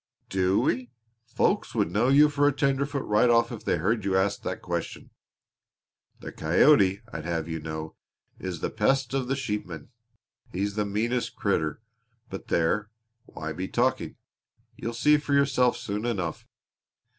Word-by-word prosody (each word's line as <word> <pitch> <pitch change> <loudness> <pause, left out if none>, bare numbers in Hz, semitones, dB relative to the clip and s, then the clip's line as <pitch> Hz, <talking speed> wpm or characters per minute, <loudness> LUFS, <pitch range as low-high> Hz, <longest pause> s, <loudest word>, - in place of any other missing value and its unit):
Do 95 0 +2
we? 125 +1 0 0.4
Folks - - 0
would - - +1
know 110 +6 +2
you 145 +3 +6
for 145 -1 +2
a - - +4
tenderfoot 140 0 0
right 105 +4 +3
off 115 0 +3
if 115 - -7
they - - +1
heard 105 +6 0
you 95 -1 +1
ask 100 +1 0
that 95 - -4
question! 85 -2 -4 1.1
The - - -7
coyote, 95 - +4
I'd 80 -1 -5
have 80 -2 -2
you 80 -1 -4
know, 80 0 -6 0.5
is 90 -4 -5
the - - -2
pest 130 +4 +1
of 135 -2 -1
the 135 - 0
sheepman. 105 - -5 0.6
He's 100 +2 -2
the 105 0 -1
meanest 115 +4 -1
critter 80 +7 -1 0.5
but 95 - -7
there, 105 +6 +1 0.4
why 80 0 -6
be 90 +4 -4
talking? - - 0 0.6
You'll 115 0 -5
see 150 +5 +4
for 145 -1 -1
yourself 130 -3 +3
soon 110 -1 -3
enough. 90 -9 -3
105 Hz, 155 wpm, -27 LUFS, 90-125 Hz, 1.1 s, you